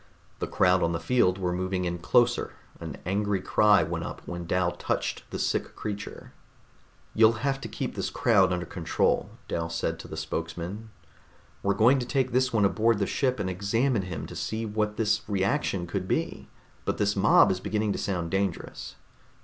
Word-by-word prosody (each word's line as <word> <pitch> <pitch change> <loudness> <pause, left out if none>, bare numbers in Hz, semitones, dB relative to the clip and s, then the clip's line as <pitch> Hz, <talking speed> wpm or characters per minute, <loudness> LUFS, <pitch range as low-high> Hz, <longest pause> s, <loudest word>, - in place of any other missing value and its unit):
The - - -2
crowd 90 0 +3
on 85 0 +1
the 85 - -1
field 90 0 +2
were 90 -2 -1
moving 95 0 -1
in 85 0 -2
closer; 115 +7 +2 0.3
an 80 -4 -6
angry 100 +1 0
cry 105 +2 +4
went - - -3
up - - -7
when 85 -1 -5
Dal 90 0 +1
touched - - -3
the - - -4
sick - - -1
creature. 105 -1 -6 0.8
"You'll 110 +2 +4
have 135 -1 0
to - - -5
keep - - -4
this - - -2
crowd - - +3
under 90 -1 -1
control," 85 -1 0 0.2
Dal 85 0 -2
said 80 0 -2
to - - -9
the 80 - -7
spokesman. 85 +7 -4 0.7
"We're 100 0 +1
going 125 +5 +5
to 125 - -4
take 130 -1 0
this 130 +1 +2
one 110 -3 +3
aboard 110 +3 +3
the 100 - +1
ship 130 +3 0
and 100 - -1
examine 105 +6 +1
him 90 -3 -5
to - - -9
see 110 +1 -3
what 105 0 -1
this 110 -1 +2
reaction 95 -2 0
could 85 - -3
be, - - -2 0.3
but - - -1
this 105 0 +1
mob 100 0 +5
is 95 - -1
beginning 105 +2 -1
to - - -4
sound 85 -4 -2
dangerous." 95 -2 -3
100 Hz, 185 wpm, -27 LUFS, 90-110 Hz, 0.8 s, going